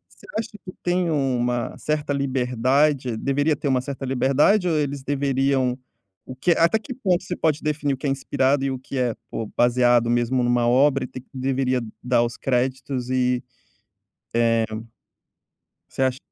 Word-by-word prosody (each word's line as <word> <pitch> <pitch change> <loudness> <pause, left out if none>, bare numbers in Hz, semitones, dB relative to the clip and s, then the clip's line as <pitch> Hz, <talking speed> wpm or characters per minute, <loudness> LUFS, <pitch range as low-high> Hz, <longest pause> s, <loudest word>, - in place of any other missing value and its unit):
Você - - -17
acha 225 - -3 0.2
que 185 - -8
tem 180 -1 +1
uma 125 -4 0
certa 150 -1 -1
liberdade? 130 0 +1
Deveria 145 +5 +1
ter - - -3
uma 130 -2 +2
certa 135 0 -6
liberdade 135 - +3
ou 160 - +1
eles 140 -2 -2
deveriam 135 -2 +1 0.5
o 130 - -7
que 135 +7 +1
até 170 +6 +3
que 255 +4 -7
ponto 190 -8 0
se 180 - -4
pode 155 -1 0
definir 150 -2 -1
o 135 - -4
que 140 - -3
é - - +1
inspirado 135 0 +1
e 135 - 0
o 130 - -4
que 135 +1 -7
é, 125 -3 0 0.2
pô, 110 - -4
baseado 120 -1 +4
mesmo 120 +2 +1
numa 120 0 +2
obra? 135 +2 +3
E - - -8
tem 130 - -9
que - - -32
deveria 130 -1 0 0.2
dar 120 -1 +3
os 120 0 -3
créditos 130 0 -1
e, 125 -1 +1 0.9
eh 115 -1 +3 1.2
você - - -3
acha 130 -1 +1
130 Hz, 175 wpm, -23 LUFS, 125-145 Hz, 1.2 s, baseado